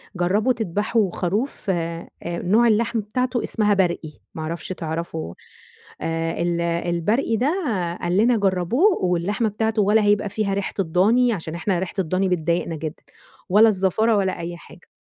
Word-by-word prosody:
جربوا 200 +8 +2
تدبحوا 210 -1 0
خروف 205 +6 -2
آآ، 170 -2 -2 0.2
نوع 180 +7 +2
اللحم 225 +1 +2
بتاعته 245 +4 -1
اسمها 210 -2 +1
برقي، 170 -5 0 0.2
ما 160 - -5
أعرفش 165 +2 -5
تعرفه؟ 165 - -4 0.7
آآ 165 0 -2
ال 170 0 0
البرقي 175 +7 0
ده 255 - +1 0.5
قال 175 +1 0
لنا 230 +2 +4
جربوه 200 - +2
واللحمة 185 +6 0
بتاعته 220 +1 0
ولا 210 +2 +3
هيبقى 205 0 +2
فيها 205 0 -1
ريحة 195 0 -2
الضاني،- 210 +8 +3
عشان 165 -3 -5
إحنا 175 +1 -1
ريحة 185 +2 -5
الضاني 185 +2 0
بتضايقنا 170 -1 0
جدًا- 155 0 -6 0.5
ولا 215 +4 +6
الزفارة 215 +3 +2
ولا 190 -2 0
أي 170 +1 -5
حاجة. 175 - -16
190 Hz, 150 wpm, -22 LUFS, 170-220 Hz, 0.7 s, ولا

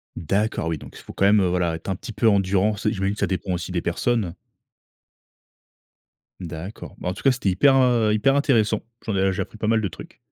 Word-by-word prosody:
D'accord 100 +1 -1
oui, 80 -1 -1
donc - - -12
il - - -11
faut - - -11
quand 100 - +1
même, 105 +1 +5
heu, 95 - +2
voilà, 90 -2 0
être 80 +4 -8
un 95 - 0
petit 115 - -8
peu 105 +3 +1
endurant. 100 0 +2
C 105 +1 -1
j'imagine 95 -2 -1
que - - -11
ça - - +1
dépend 95 0 -2
aussi 90 +1 -4
des 85 - -1
personnes? 100 0 -1 2.1
D'accord. 85 +2 -8
Bah, 90 - -3
en - - -2
tout - - -11
cas, 135 - +5
c'était 125 -6 -1
hyper, 135 +9 +4
heu, 120 -4 +3
hyper 125 +6 +3
intéressant. 115 -7 +2 0.2
J'en 110 - -2
ai 95 0 +2
j'ai - - -2
appris 110 - -7
pas 110 - -2
mal 110 0 +3
de 100 - 0
trucs. - - -12
100 Hz, 235 wpm, -23 LUFS, 90-110 Hz, 2.1 s, même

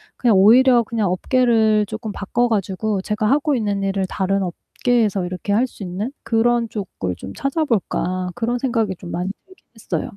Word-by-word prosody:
그냥 230 -6 +3
오히려 240 +4 +6
그냥 220 -4 -1
업계를 220 0 +2
조금 215 0 -6
바꿔 240 +5 0
가지고 200 -1 -1
제가 210 +2 -2
하고 290 +1 +2
있는 205 -4 -1
일을 195 -1 0
다른 195 +1 -1
업계에서 205 +2 -1
이렇게 180 +3 -4
할 240 +5 +3
수 205 - -11
있는 200 +9 -4
그런 230 0 +1
쪽을 145 - -4
좀 95 - -8
찾아볼까 220 - -1
그런 240 +1 -1
생각이 230 -6 -1
좀 175 0 -10
많이 180 +2 -2 0.2
들긴 375 0 -21
했어요. 185 -7 -3
215 Hz, 355 characters per minute, -20 LUFS, 190-240 Hz, 0.2 s, 오히려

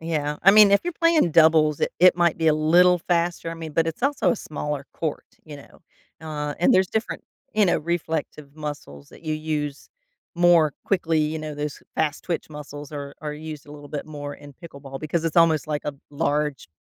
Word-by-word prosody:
Yeah, 150 -3 -2
I 195 - +8
mean, 210 -1 +8
if 200 - +5
you're 350 - -2
playing 330 - +2
doubles, 155 -2 +4
it - - 0
it 180 0 +6
might 170 -2 +2
be 160 - 0
a 155 - +5
little 175 +4 +4
faster, 170 -1 -1
I - - -5
mean, 165 -2 -8
but 165 +1 +1
it's 165 - -6
also 280 0 +2
a 240 - 0
smaller 150 -4 -5
court, 160 -3 -4 0.2
you 150 -2 -9
know? 140 - -16 0.4
Uh, 150 -2 -4
and 175 - +4
there's 185 0 +4
different, 220 +3 -3 0.3
you 210 -1 +3
know, 175 - +2
reflective 160 -3 -4
muscles 145 - -8
that - - -16
you 155 -1 -1
use 150 -2 -4 0.5
more 175 -3 +5
quickly, 165 -5 +1
you 155 +1 0
know? 155 -1 -6
Those 150 0 -5
fast-twitch 160 +3 -2
muscles 150 -1 -9
are 140 -1 -6
are 150 -1 -4
used 155 -1 -8
a 145 - -12
little 145 -1 -11
bit 145 0 -5
more 145 -2 -7
in 145 -1 -13
pickleball, 140 -4 -9
because 155 +2 -2
it's 165 +1 -2
almost 160 -3 +4
like 150 -1 -2
a 150 - -3 0.2
large 150 - -1
155 Hz, 205 wpm, -24 LUFS, 150-170 Hz, 0.5 s, I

